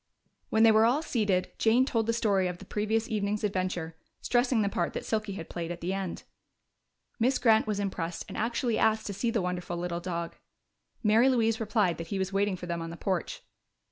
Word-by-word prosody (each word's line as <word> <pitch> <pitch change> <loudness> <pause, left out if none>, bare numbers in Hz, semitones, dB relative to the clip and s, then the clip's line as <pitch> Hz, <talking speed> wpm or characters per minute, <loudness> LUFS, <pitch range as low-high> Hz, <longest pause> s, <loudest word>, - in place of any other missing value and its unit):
When 220 0 +3
they 225 - +8
were 220 0 +5
all 280 +7 +1
seated, 205 - 0
Jane 235 +3 +4
told 225 -4 0
the 230 - +2
story 200 -5 +2
of 180 -1 -4
the 195 - -12
previous 215 +3 -1
evening's 210 -1 -1
adventure, 185 -5 -2 0.2
stressing 245 -2 +2
the - - +1
part 175 -3 -1
that - - -5
Silky 215 -2 -1
had 165 -4 -7
played 170 -1 -5
at 175 - -5
the 180 +3 -2
end. 195 -3 -4 1.0
Miss 255 +3 +3
Grant 220 -3 +4
was 210 -1 -1
impressed 175 -4 -3
and - - -8
actually 235 +1 0
asked 220 0 +2
to 200 - -3
see 230 +5 -1
the 225 -4 0
wonderful 180 -1 -3
little 170 0 -3
dog. 170 -1 -4 0.7
Mary 225 +4 +5
Louise 225 -2 +2
replied 210 -6 +1
that 165 - -5
he 195 - -3
was 190 0 -2
waiting 200 0 +1
for 180 - -8
them 170 -1 -3
on 165 - -5
the 170 - -8
porch. 185 -3 -2
205 Hz, 210 wpm, -29 LUFS, 180-225 Hz, 1.0 s, they